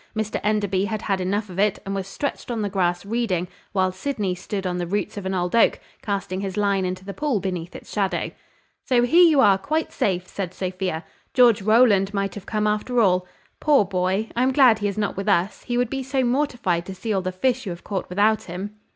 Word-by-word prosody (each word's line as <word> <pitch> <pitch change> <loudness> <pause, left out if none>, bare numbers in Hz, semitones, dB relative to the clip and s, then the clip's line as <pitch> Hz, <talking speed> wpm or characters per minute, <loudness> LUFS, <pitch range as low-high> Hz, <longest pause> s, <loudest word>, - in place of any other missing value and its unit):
Mr 215 -1 -1
Enderby 205 -2 +1
had 215 +1 -3
had 195 -2 0
enough 200 +3 -1
of 185 0 -7
it, 205 0 +2
and 195 - -3
was 195 -1 -3
stretched 280 +8 -4
on 230 -3 -2
the 200 - -2
grass 175 -2 0
reading, 200 -5 -1 0.2
while 185 -2 +1
Sydney 195 -1 -2
stood 195 +2 -5
on 180 -1 -1
the 175 - -2
roots 205 +4 -2
of 200 -2 -5
an 190 - -1
old 180 +2 -1
oak, 230 - +4 0.2
casting 195 -2 -3
his 195 -1 -4
line 200 -2 +1
into 185 +1 -4
the 200 - -6
pool 290 -5 0
beneath 180 -3 -4
its - - -10
shadow. 195 -2 -1 0.5
"So, 245 -2 +3
here 330 +9 +5
you 310 -5 +6
are, 200 -5 +5
quite 310 +9 -1
safe!" 185 -2 0
said 185 -3 -5
Sophia; 185 -3 -3 0.3
"George 240 -5 +6
Rowland 210 -2 +4
might 195 0 -1
have 205 - -9
come 215 -1 0
after 215 +4 0
all. 180 -4 +3 0.3
Poor 290 -8 +4
boy! 190 +3 -1
I 240 - +1
am 260 +1 +3
glad 255 -5 +6
he 205 - 0
is 200 - -4
not 210 -1 -1
with 195 +2 -2
us, 190 +1 +1
he 240 - -1
would 245 -1 0
be 270 - -2
so 265 0 0
mortified 240 -9 0
to 190 - -6
see 220 +3 -3
all 190 - +1
the 185 0 -3
fish 250 +5 0
you - - -1
have 170 -1 -7
caught 195 -3 -4
without 210 +4 +2
him!" 190 +4 -6
200 Hz, 230 wpm, -23 LUFS, 185-225 Hz, 0.5 s, you